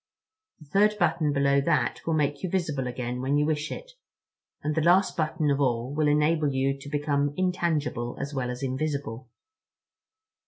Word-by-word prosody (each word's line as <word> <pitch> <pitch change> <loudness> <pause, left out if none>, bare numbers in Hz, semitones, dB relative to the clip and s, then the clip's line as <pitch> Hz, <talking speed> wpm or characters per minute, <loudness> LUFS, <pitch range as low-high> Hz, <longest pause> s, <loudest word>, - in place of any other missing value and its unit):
The 155 - -14
third 205 +8 +3
button 170 -5 +1
below 140 0 +3
that 140 -5 0
will 165 - +2
make 145 -2 0
you 185 - -2
visible 155 -8 -1
again 125 0 -4
when 135 +2 +1
you 150 - +2
wish 150 0 -1
it, - - -7 0.7
and 150 - 0
the 160 - +1
last 180 +4 +4
button 155 -2 0
of 140 0 +1
all 125 0 0
will 150 0 +1
enable 150 0 +2
you 135 +1 0
to 140 - -9
become 145 -1 0
intangible 165 -9 -1
as 140 +1 -4
well 130 -3 -2
as 125 +2 -5
invisible." 130 -3 -3
145 Hz, 170 wpm, -27 LUFS, 135-155 Hz, 0.7 s, last